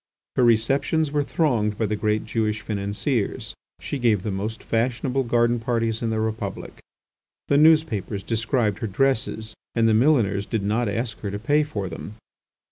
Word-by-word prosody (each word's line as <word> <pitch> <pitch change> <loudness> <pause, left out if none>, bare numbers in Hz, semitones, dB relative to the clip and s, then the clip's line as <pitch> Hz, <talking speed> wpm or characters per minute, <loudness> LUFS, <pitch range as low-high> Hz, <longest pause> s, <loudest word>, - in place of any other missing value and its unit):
Her 125 - +3
receptions 135 +7 +2
were 145 0 +1
thronged 120 -9 0
by 115 - 0
the 105 0 -1
great 105 0 0
Jewish 110 -2 -1
financiers. 105 +3 -2 0.3
She 140 - -4
gave 110 -6 +2
the 105 - -2
most 105 +4 -4
fashionable 125 +3 0
garden 120 0 +2
parties 115 -1 -1
in 115 - -1
the 110 0 -1
Republic. 110 -3 -4 0.7
The 140 - +4
newspapers 150 - +3
described 115 -2 0
her 115 - -2
dresses 110 -1 0 0.2
and 115 -1 +3
the 110 - +4
milliners 110 -6 +3
did 110 -4 -2
not 110 +3 0
ask 115 +1 -3
her 100 - -4
to 100 - -4
pay 145 +8 +2
for 110 -10 -3
them. 90 +4 -8
115 Hz, 165 wpm, -24 LUFS, 105-125 Hz, 0.7 s, The